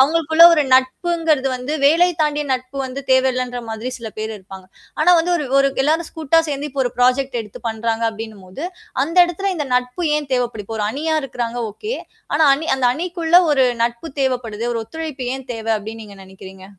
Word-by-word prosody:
அவங்களுக்குள்ள 320 Hz, +3 st, +5 dB
ஒரு 305 Hz, -, +3 dB
நட்புங்குறது 305 Hz, +2 st, +1 dB
வந்து, 250 Hz, +4 st, -5 dB
வேலை 345 Hz, +5 st, +5 dB
தாண்டிய 295 Hz, -1 st, 0 dB
நட்பு 255 Hz, +2 st, -7 dB
வந்து 260 Hz, +2 st, -6 dB
தேவையில்லைன்ற 255 Hz, -1 st, +1 dB
மாதிரி 225 Hz, +3 st, -4 dB
சில 230 Hz, -2 st, -6 dB
பேர் 220 Hz, +1 st, -3 dB
இருப்பாங்க. 190 Hz, 0 st, -12 dB, 0.3 s
ஆனால் 350 Hz, +3 st, +6 dB
வந்து 345 Hz, +2 st, +1 dB, 0.5 s
எல்லாரும் 315 Hz, +3 st, +1 dB
கூட்டா 320 Hz, 0 st, +1 dB
சேர்ந்து 290 Hz, 0 st, -3 dB
ஒரு 245 Hz, -, 0 dB
புராஜெக்ட் 250 Hz, 0 st, +2 dB
எடுத்து 210 Hz, -3 st, -10 dB
பண்ணுகிறாங்க, 225 Hz, 0 st, -1 dB
அப்படின்னும் 220 Hz, -3 st, -9 dB
போது 185 Hz, +10 st, -9 dB, 0.4 s
அந்த 330 Hz, +5 st, -4 dB
இடத்துல 390 Hz, +3 st, -2 dB
இந்த 300 Hz, -4 st, -3 dB
நட்பு 250 Hz, +7 st, -1 dB
ஏன் 295 Hz, -2 st, -4 dB
தேவைப்படும்? 235 Hz, -4 st, -2 dB
ஒரு 210 Hz, -, 0 dB
அணியா 315 Hz, +6 st, -2 dB
இருக்குறாங்க. 245 Hz, -2 st, -4 dB
ஒகே! 430 Hz, -, -5 dB, 0.4 s
ஆனால், 315 Hz, -2 st, +4 dB
அணி 320 Hz, +4 st, -5 dB
அந்த 260 Hz, -2 st, +1 dB
அணிக்குள்ள 340 Hz, +2 st, +1 dB
ஒரு 270 Hz, -3 st, +4 dB, 0.2 s
நட்பு 235 Hz, +6 st, -2 dB
தேவைப்படுது. 240 Hz, -4 st, -2 dB
ஒரு 230 Hz, -, -2 dB
ஒத்துழைப்பு 310 Hz, -3 st, -6 dB
ஏன் 265 Hz, -1 st, -9 dB
தேவை 225 Hz, 0 st, -2 dB
அப்பன்னு 220 Hz, +2 st, -8 dB
நீங்க 205 Hz, -2 st, -12 dB
நினைக்கிறீங்க? 190 Hz, 0 st, -13 dB
260 Hz, 170 wpm, -19 LUFS, 230-315 Hz, 0.5 s, ஆனால்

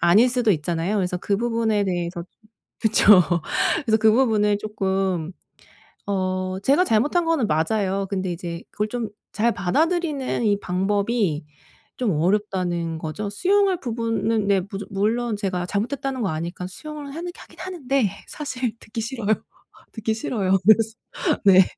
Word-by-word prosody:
아닐 205 Hz, +9 st, +5 dB
수도 240 Hz, -3 st, +2 dB
있잖아요. 165 Hz, +4 st, -1 dB
그래서 180 Hz, -2 st, 0 dB
그 200 Hz, +2 st, -1 dB
부분에 225 Hz, -2 st, +1 dB
대해서 175 Hz, -2 st, -2 dB
좀 215 Hz, +4 st, -22 dB, 0.3 s
그쵸. 210 Hz, -3 st, +6 dB, 0.6 s
그래서 220 Hz, -2 st, +3 dB
그 220 Hz, 0 st, +5 dB
부분을 215 Hz, -4 st, +3 dB
조금 190 Hz, -5 st, -1 dB, 0.8 s
어 185 Hz, -1 st, -1 dB
제가 280 Hz, -, +4 dB
잘못한 295 Hz, +6 st, +2 dB
거는 320 Hz, -9 st, +1 dB
맞아요. 195 Hz, +5 st, 0 dB
근데 190 Hz, -2 st, -2 dB
이제 170 Hz, -1 st, -6 dB
그걸 210 Hz, +1 st, -2 dB
좀 230 Hz, -2 st, -3 dB, 0.2 s
잘 230 Hz, +2 st, +2 dB
받아들이는 290 Hz, -, 0 dB
이 205 Hz, -1 st, +2 dB
방법이 195 Hz, -2 st, 0 dB, 0.5 s
좀 240 Hz, -6 st, 0 dB
어렵다는 175 Hz, -1 st, 0 dB
거죠. 200 Hz, +7 st, -4 dB
수용할 385 Hz, -, +2 dB
부분은 225 Hz, -2 st, -1 dB
네. 195 Hz, -2 st, +3 dB
무조 195 Hz, +1 st, -5 dB
물론 220 Hz, +3 st, 0 dB
제가 185 Hz, -3 st, -2 dB
잘못했다는 255 Hz, +6 st, -2 dB
거 195 Hz, -, 0 dB
아니까 170 Hz, +3 st, -4 dB
수용을 295 Hz, -, -8 dB
하는 350 Hz, +1 st, -4 dB
하긴 -, -, -15 dB
하는데 275 Hz, -, 0 dB, 0.2 s
사실 255 Hz, -6 st, -3 dB
듣기 225 Hz, +1 st, -6 dB
싫어요. 230 Hz, -1 st, -4 dB, 0.6 s
듣기 220 Hz, -1 st, -2 dB
싫어요. 195 Hz, -4 st, 0 dB
그래서 220 Hz, +2 st, +4 dB, 0.5 s
네. 190 Hz, -1 st, +8 dB
210 Hz, 310 characters per minute, -23 LUFS, 185-240 Hz, 0.8 s, 네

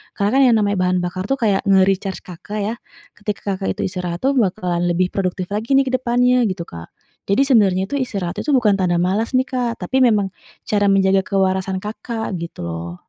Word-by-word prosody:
karena 250 Hz, +6 st, +3 dB
yang -, -, +4 dB
namanya 205 Hz, -1 st, 0 dB
bahan 180 Hz, 0 st, +1 dB
bakar 180 Hz, +1 st, -3 dB
tuh 270 Hz, -, +1 dB
kayak 205 Hz, -5 st, +1 dB
nge-recharge 195 Hz, 0 st, +2 dB
Kakak 185 Hz, +4 st, -7 dB
ya, 220 Hz, +3 st, -2 dB, 0.4 s
ketika 205 Hz, -1 st, -3 dB
Kakak 190 Hz, 0 st, -3 dB
itu -, -, 0 dB
istirahat 180 Hz, -2 st, -4 dB
tuh 275 Hz, +1 st, +2 dB
bakalan 180 Hz, -6 st, 0 dB
lebih 180 Hz, +1 st, +1 dB
produktif 185 Hz, -2 st, -2 dB
lagi 215 Hz, +5 st, -3 dB
nih 270 Hz, -, +1 dB
ke 260 Hz, -, -2 dB
depannya 250 Hz, 0 st, +2 dB
gitu 185 Hz, -3 st, -3 dB
Kak. 85 Hz, 0 st, -10 dB, 0.4 s
Jadi 200 Hz, +8 st, +4 dB
sebenarnya 200 Hz, -8 st, +3 dB
itu -, -, -2 dB
istirahat 195 Hz, -8 st, -3 dB
itu 300 Hz, -, -2 dB
bukan 220 Hz, -5 st, +3 dB
tanda 175 Hz, -2 st, +1 dB
males 195 Hz, +6 st, 0 dB
nih 260 Hz, +1 st, +1 dB
Kak, 245 Hz, -3 st, -2 dB
tapi 260 Hz, +9 st, 0 dB
memang 210 Hz, -5 st, +3 dB, 0.4 s
cara 205 Hz, -1 st, +2 dB
menjaga 195 Hz, 0 st, +3 dB
kewarasan 190 Hz, -1 st, 0 dB
Kakak 220 Hz, +1 st, -5 dB
gitu 170 Hz, -, -7 dB
loh. 85 Hz, +1 st, -5 dB
200 Hz, 195 wpm, -20 LUFS, 185-230 Hz, 0.4 s, yang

